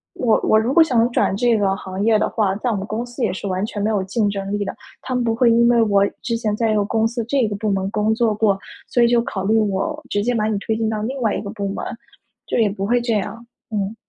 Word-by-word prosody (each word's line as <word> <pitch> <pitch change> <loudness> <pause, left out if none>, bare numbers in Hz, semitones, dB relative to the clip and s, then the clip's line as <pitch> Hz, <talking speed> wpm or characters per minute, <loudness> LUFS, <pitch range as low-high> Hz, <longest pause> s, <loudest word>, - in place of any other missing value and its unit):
我 230 -3 +2
我 220 - +4
如 235 +5 0
果 335 - +7
想 245 -6 +2
转 - - +1
这 240 -1 +3
个 195 -2 +1
行 190 +1 -5
业 220 -1 +4
的 - - 0
话， 205 -4 0
在 245 - -2
我 225 - 0
们 195 0 -3
公 225 +4 -3
司 240 0 -6
也 200 - +1
是 190 +2 -5
完 185 +1 -1
全 210 -1 -5
没 210 - +1
有 205 -3 0
竞 205 +2 0
争 195 -1 -4
力 205 0 -1
的。 - - -5 0.3
他 255 - -4
们 250 - +1
不 230 - +1
会 235 +1 +3
因 235 +1 +4
为 235 -1 +4
我 200 -2 +3 0.2
之 230 -2 -2
前 220 -2 -1
在 225 -1 +1
一 - - +1
个 205 - +2
公 220 +2 +1
司 235 0 -3
这 265 -5 +2
个 205 - -3
部 210 +1 -1
门 195 0 -1
工 215 +1 +1
作 220 -2 +1
过， 205 -2 +2 0.3
所 245 - +2
以 235 - +6
就 235 0 +3
考 195 -5 -4
虑 220 +3 +3
我， 215 +8 0
直 205 - 0
接 245 +3 0
把 215 -1 +1
你 215 - 0
推 220 +2 -2
进 220 0 -1
到 215 -1 -2
另 260 +5 -3
外 220 -3 +1
一 - - -2
个 200 - -6
部 200 -2 -4
门， 195 - -4 0.6
就 - - -2
也 225 -3 +3
不 195 0 -4
会 240 +3 +2
这 235 -1 -1
样。 220 +3 -3 0.3
嗯。 205 +1 -2
220 Hz, 315 characters per minute, -20 LUFS, 200-235 Hz, 0.6 s, 果